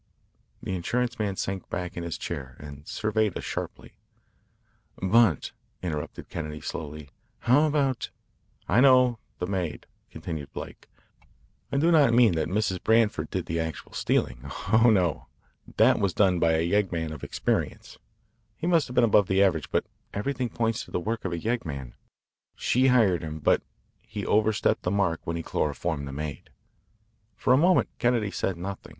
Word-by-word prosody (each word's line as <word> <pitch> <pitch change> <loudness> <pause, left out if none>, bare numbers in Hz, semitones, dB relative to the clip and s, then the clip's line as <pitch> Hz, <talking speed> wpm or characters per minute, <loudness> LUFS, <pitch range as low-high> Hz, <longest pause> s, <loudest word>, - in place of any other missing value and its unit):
The - - -3
insurance 120 +7 -1
man 100 -3 -1
sank 95 -1 -4
back 90 0 -4
in 85 - -4
his 85 -1 -4
chair 65 -2 -6
and 70 0 -10
surveyed 110 -2 0
us - - -6
sharply. - - -6 1.1
"But," 95 - +3 0.3
interrupted 75 -4 -4
Kennedy 75 -2 -5
slowly, 75 -2 -6 0.3
"how 135 +6 +4
about 140 -4 0 0.3
" - - -39
"I 120 - +4
know 125 -3 +5 0.2
the 90 - -2
maid," 90 -5 -3 0.2
continued 80 -5 -6
Blake. - - -9 0.8
"I - - 0
do 165 +5 +3
not 140 -8 +5
mean 120 -6 +6
that 80 - 0
Mrs. 95 0 -1
Branford 110 -1 +2
did - - -3
the 80 +1 -2
actual 80 -1 -5
stealing. - - 0 0.3
Oh, 115 +2 +6
no. 90 -8 +1 0.5
That - - +5
was 100 -3 0
done 95 -4 +3
by 85 -1 +3
a 80 +1 +1
yeggman 85 -5 0
of 75 - -10
experience. - - -2 0.6
He - - -5
must 170 -4 +3
have 125 - -8
been 125 - +5
above 105 -4 +4
the 95 +1 +4
average, 85 -6 +1
but - - 0 0.3
everything 125 +3 -2
points 115 -1 -1
to - - -16
the - - -1
work 110 +4 -3
of 95 - -1
a 85 - -2
yeggman. 80 - -3 0.6
She 130 +2 +2
hired 110 -9 +4
him. 80 -1 -5
But 75 - +2 0.4
he 110 -3 -6
overstepped 110 +1 +2
the - - -1
mark 95 -4 +1
when 85 - -2
he 85 - -4
chloroformed 75 -1 -2
the - - -6
maid." 75 +1 -6 0.9
For 125 - +2
a - - +7
moment 180 +5 +4
Kennedy 120 -4 +1
said 95 -3 -2
nothing. 95 +3 -6
95 Hz, 170 wpm, -27 LUFS, 80-115 Hz, 1.1 s, a